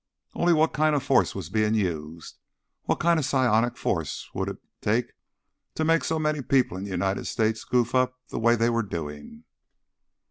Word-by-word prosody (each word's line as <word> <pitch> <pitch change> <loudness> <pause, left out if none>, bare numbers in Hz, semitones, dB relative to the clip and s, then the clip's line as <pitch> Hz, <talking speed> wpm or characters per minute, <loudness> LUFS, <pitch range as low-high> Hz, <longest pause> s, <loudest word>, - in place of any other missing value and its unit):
Only 175 0 +2
what 160 -1 +3
kind 155 0 +2
of 140 - 0
force 135 -2 +2
was 95 -5 -6
being 110 +1 +2
used? 85 -5 -4 0.5
What - - 0
kind 170 0 +3
of - - -1
psionic 120 -4 +2
force - - -2
would - - -2
it - - -6 0.2
take 115 +4 0 0.6
to 155 - 0
make 165 +1 +3
so 160 - -1
many 155 -1 0
people 130 -7 +1
in 95 +2 -5
the - - -7
United 95 +1 -1
States 110 0 0
goof 120 -1 0
up 130 0 +1
the - - -4
way 115 +1 +4
they 115 +1 +2
were 115 0 +1
doing? 75 -5 -7
115 Hz, 185 wpm, -26 LUFS, 100-140 Hz, 0.6 s, way